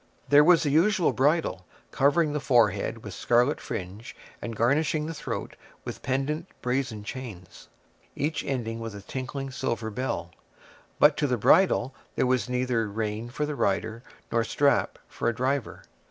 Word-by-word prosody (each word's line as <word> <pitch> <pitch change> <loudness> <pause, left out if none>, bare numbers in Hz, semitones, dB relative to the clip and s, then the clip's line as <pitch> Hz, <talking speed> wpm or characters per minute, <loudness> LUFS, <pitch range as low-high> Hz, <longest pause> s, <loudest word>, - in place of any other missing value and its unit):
There 145 +1 +7
was 170 +1 +5
the 145 - +1
usual 180 +4 +3
bridle, 135 - +1 0.2
covering 145 +2 +2
the 150 - 0
forehead 115 -4 +2
with 105 - -7
scarlet 120 - +2
fringe, 100 +6 -6 0.3
and 115 -1 -5
garnishing 150 +6 +1
the 165 - -4
throat - - -5 0.3
with - - -6
pendent 140 +5 -1 0.2
brazen 125 -4 -1
chains, 105 -7 -9 0.5
each 150 +2 -1
ending 115 -4 -3
with 115 -2 -6
a 100 - -8
tinkling 135 +4 -5
silver 115 -3 -3
bell; 115 -6 -3 0.7
but 150 0 +5
to 150 - +1
the 125 -2 0
bridle 135 - +4 0.2
there - - +2
was 125 -4 +1
neither 125 -3 0
rein 110 +2 -3
for 150 +4 -2
the 150 - -3
rider 110 -2 -1 0.3
nor 115 0 +2
strap 140 +4 +1
for - - -1
a 120 - -3
driver. 130 +1 -2
130 Hz, 155 wpm, -27 LUFS, 115-145 Hz, 0.7 s, There